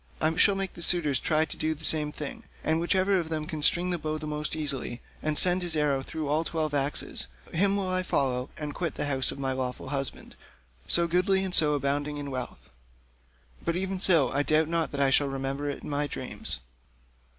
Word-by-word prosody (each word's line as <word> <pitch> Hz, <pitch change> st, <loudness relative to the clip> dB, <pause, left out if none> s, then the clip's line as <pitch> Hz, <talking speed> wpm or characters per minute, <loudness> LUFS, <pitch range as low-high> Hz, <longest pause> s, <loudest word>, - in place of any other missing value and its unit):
I 160 Hz, +1 st, +1 dB
shall 195 Hz, +3 st, +5 dB
make 195 Hz, -1 st, -2 dB
the 170 Hz, -, -10 dB
suitors 165 Hz, -6 st, +1 dB
try 155 Hz, 0 st, +1 dB
to -, -, -8 dB
do 155 Hz, 0 st, -1 dB
the 160 Hz, +1 st, -8 dB
same 150 Hz, -2 st, +5 dB
thing, 150 Hz, -1 st, -7 dB, 0.2 s
and 160 Hz, +1 st, +1 dB
whichever 190 Hz, +3 st, +2 dB
of 165 Hz, -2 st, -4 dB
them 155 Hz, -1 st, -3 dB
can 155 Hz, 0 st, -5 dB
string 175 Hz, +4 st, +3 dB
the 175 Hz, -, -1 dB
bow 155 Hz, 0 st, -3 dB
most 150 Hz, 0 st, -1 dB
easily, 140 Hz, -5 st, -1 dB, 0.2 s
and 155 Hz, -1 st, +2 dB
send 180 Hz, +2 st, +5 dB
his 175 Hz, -2 st, +2 dB
arrow 145 Hz, -3 st, +1 dB
through 155 Hz, +3 st, -5 dB
all 150 Hz, +3 st, +1 dB
the -, -, -6 dB
twelve 155 Hz, -2 st, -2 dB
axes, 140 Hz, -, -1 dB, 0.3 s
him 195 Hz, +4 st, +2 dB
will 195 Hz, -2 st, -1 dB
I 185 Hz, 0 st, +1 dB
follow, 130 Hz, -7 st, -1 dB
and 150 Hz, -1 st, -5 dB
quit 170 Hz, 0 st, -3 dB
this -, -, -2 dB
house 135 Hz, -3 st, 0 dB
of -, -, -8 dB
my 135 Hz, -1 st, -2 dB
lawful 130 Hz, 0 st, -4 dB
husband, 135 Hz, -1 st, -2 dB, 0.5 s
so 170 Hz, -, +4 dB
goodly 185 Hz, +3 st, +2 dB
and 190 Hz, -1 st, -3 dB
so 150 Hz, -3 st, +6 dB
abounding 145 Hz, +1 st, -1 dB
in 145 Hz, -1 st, -5 dB
wealth. 130 Hz, -2 st, -7 dB, 0.9 s
But 170 Hz, -, -1 dB
even 190 Hz, +1 st, -2 dB
so, 170 Hz, -7 st, +4 dB
I 140 Hz, -, +1 dB
doubt 155 Hz, +1 st, +2 dB
not 165 Hz, -1 st, 0 dB
that 140 Hz, -, -3 dB
I 135 Hz, -1 st, +3 dB
shall 145 Hz, +1 st, +3 dB
remember 135 Hz, +1 st, -3 dB
it 140 Hz, -, -6 dB
in -, -, -7 dB
my 145 Hz, +1 st, 0 dB
dreams." -, -, -4 dB
155 Hz, 215 wpm, -27 LUFS, 140-170 Hz, 0.9 s, so